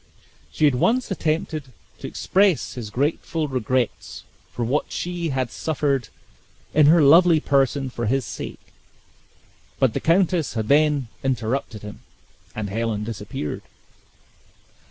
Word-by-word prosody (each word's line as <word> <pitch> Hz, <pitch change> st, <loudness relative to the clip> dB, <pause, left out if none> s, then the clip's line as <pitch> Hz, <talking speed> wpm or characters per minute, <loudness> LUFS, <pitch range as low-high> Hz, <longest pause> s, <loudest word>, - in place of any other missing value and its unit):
He 155 Hz, -, +1 dB
had 145 Hz, -, +4 dB
once 230 Hz, -, +1 dB
attempted 155 Hz, -4 st, -1 dB, 0.3 s
to -, -, -6 dB
express 195 Hz, -4 st, +1 dB
his 120 Hz, -5 st, -6 dB
grateful 150 Hz, +5 st, -1 dB
regrets 130 Hz, -2 st, -2 dB, 0.3 s
for 120 Hz, -, -3 dB
what 135 Hz, +6 st, -1 dB
she 175 Hz, -2 st, -3 dB
had 130 Hz, -3 st, -2 dB
suffered 140 Hz, -6 st, -1 dB, 0.6 s
in 150 Hz, -1 st, +5 dB
her 160 Hz, 0 st, +6 dB
lovely 165 Hz, +3 st, +6 dB
person 135 Hz, -2 st, +1 dB
for 120 Hz, -2 st, -3 dB
his 135 Hz, +2 st, +1 dB
sake, -, -, -8 dB, 1.0 s
but 130 Hz, -4 st, +2 dB
the -, -, -1 dB
countess 170 Hz, -3 st, +1 dB
had 110 Hz, -1 st, -2 dB
then 145 Hz, -4 st, +3 dB
interrupted 120 Hz, -3 st, -2 dB
him, 105 Hz, 0 st, -9 dB, 0.5 s
and 105 Hz, -2 st, -4 dB
Helen 110 Hz, -1 st, -2 dB
disappeared. 105 Hz, -8 st, -5 dB
135 Hz, 125 wpm, -23 LUFS, 120-155 Hz, 1.0 s, her